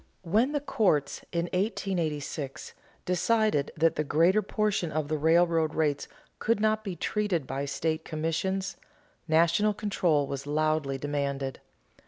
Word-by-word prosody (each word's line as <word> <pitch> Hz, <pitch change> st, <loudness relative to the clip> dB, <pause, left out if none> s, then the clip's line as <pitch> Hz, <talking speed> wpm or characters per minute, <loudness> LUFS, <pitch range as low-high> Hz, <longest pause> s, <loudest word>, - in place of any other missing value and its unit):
When 220 Hz, -, +2 dB
the 295 Hz, -, 0 dB
courts, 185 Hz, -, +1 dB
in 170 Hz, -1 st, 0 dB
1886, 165 Hz, -, -2 dB, 0.3 s
decided 180 Hz, -4 st, +1 dB
that 165 Hz, +1 st, +2 dB
the 155 Hz, -, +1 dB
greater 170 Hz, +8 st, +3 dB
portion 205 Hz, -4 st, -1 dB
of 155 Hz, -1 st, -2 dB
the 155 Hz, -, 0 dB
railroad 165 Hz, 0 st, +3 dB
rates 150 Hz, -3 st, 0 dB, 0.3 s
could 230 Hz, -1 st, +1 dB
not 215 Hz, 0 st, +1 dB
be 195 Hz, -4 st, -4 dB
treated 200 Hz, -6 st, -1 dB
by 135 Hz, +2 st, -3 dB
state 155 Hz, +3 st, -2 dB
commissions, 165 Hz, +5 st, -2 dB, 0.5 s
national 170 Hz, +6 st, +3 dB
control 175 Hz, -9 st, +1 dB
was 140 Hz, 0 st, -5 dB
loudly 155 Hz, -2 st, 0 dB
demanded. 140 Hz, -1 st, -2 dB
165 Hz, 130 wpm, -28 LUFS, 150-195 Hz, 0.5 s, greater